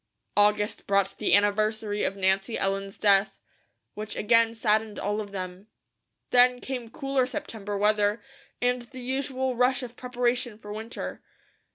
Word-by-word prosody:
August 210 0 +2
brought 195 -1 +2
the - - +4
anniversary 210 +1 +1
of 195 - 0
Nancy 195 +3 +1
Ellen's 195 0 -1
death, 200 -1 +3 0.5
which 210 0 -6
again 230 +1 +3
saddened 215 -1 +1
all 205 +2 -1
of 205 - -7
them. 185 +1 -6 0.6
Then 250 0 +5
came 250 -3 -5
cooler 270 +1 0
September 220 -8 -5
weather, 210 +1 +2 0.4
and 245 0 +1
the 255 +2 -11
usual 260 0 -2
rush 255 +2 +2
of 245 -1 -8
preparation 245 -2 -1
for 210 -1 -8
winter. 220 +2 -6
215 Hz, 140 wpm, -27 LUFS, 205-245 Hz, 0.6 s, Then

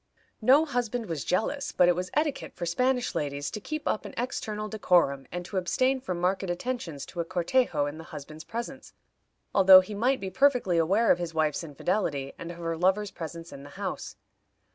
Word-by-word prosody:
No 270 +8 +6
husband 245 -4 -2
was 165 -7 -4
jealous, 275 +10 -1
but 180 - +4
it 175 - +4
was 180 +1 -3
etiquette 300 -1 -1
for 175 - -4
Spanish 250 +8 +1
ladies 145 -1 -2
to - - -5
keep 310 +8 -5
up - - 0
an - - -9
external 215 -4 -3
decorum, 175 - +2
and 175 0 -5
to 195 - -5
abstain 255 +9 +1
from 180 -7 -3
marked 185 +2 +1
attentions 175 - -4
to 175 - -9
a - - +2
cortejo 175 - +1
in 145 +2 -5
the 160 - -9
husband's 155 +2 -9
presence, 240 +4 -6 0.6
although 190 -1 +9
he 185 +3 -8
might 250 +6 +1
be 190 -1 -5
perfectly 250 -11 +3
aware 195 +8 +3
of 175 - +3
his 170 -2 -4
wife's 155 0 +1
infidelity, 145 -2 -2
and 170 - -6
of 170 - -10
her 165 -1 -3
lover's 190 +4 +1
presence 165 -1 -8
in 140 - -9
the 145 - -11
house. - - -4
185 Hz, 195 wpm, -28 LUFS, 165-235 Hz, 0.6 s, although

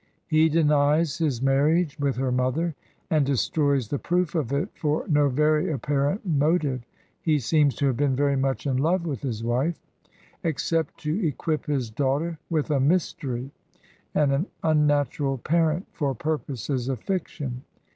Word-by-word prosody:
He 160 0 +3
denies 150 0 +2
his 140 -7 0
marriage 145 +4 +2
with 140 -2 0
her 130 0 -1
mother, 130 +7 0 0.4
and 155 -2 +4
de 140 +1 0
stroys 140 -2 +1
the 145 - -1
proof 175 -1 0
of 150 -8 -1
it 140 +1 0
for 150 0 -1
no 145 -2 +3
very 150 +4 +2
apparent 145 - -1
motive 150 -4 +1 0.4
(he 155 -2 +2
seems 145 0 +2
to 140 - 0
have 130 -4 +1
been 140 -2 +2
very 140 +1 +2
much 135 +1 -1
in 135 -2 +1
love 170 +6 +1
with 140 -8 -3
his 115 -5 -3
wife), 130 +8 0 0.6
except 165 0 -1
to 160 +7 -1
equip 155 +2 -2
his 130 -6 -1
daughter 145 +6 -1
with 155 -2 0
a 140 - +2
mystery 140 -4 0 0.6
and 145 -2 +3
an 145 +8 0 0.2
un 155 -2 +3
natural 145 -1 0
parent 165 - +1
for 140 -5 -1
purposes 135 -3 -3
of 130 -4 -2
fiction. 145 - -4
145 Hz, 160 wpm, -25 LUFS, 135-160 Hz, 0.6 s, and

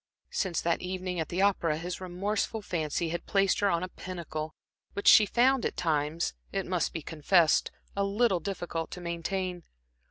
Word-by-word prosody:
Since 185 -5 0
that 170 - 0
evening 185 -1 -3
at 160 - -2
the 185 +3 +1
opera, 170 -6 +2
his 180 +3 -5
remorseful 200 +4 -2
fancy 165 -2 -1
had 170 +1 -4
placed 195 -1 +3
her 205 - +3
on 170 -1 +1
a - - -2
pinnacle, 170 -4 -6 0.4
which 200 - -3
she 210 - +9
found 255 +3 +3
at - - -2
times, 155 - 0 0.2
it - - -1
must - - 0
be 160 - -5
confessed, 160 +1 +3 0.3
a 200 - +1
little 200 -1 +2
difficult 170 -3 -4
to - - -7
maintain. 175 +1 -3
180 Hz, 170 wpm, -29 LUFS, 165-195 Hz, 0.4 s, she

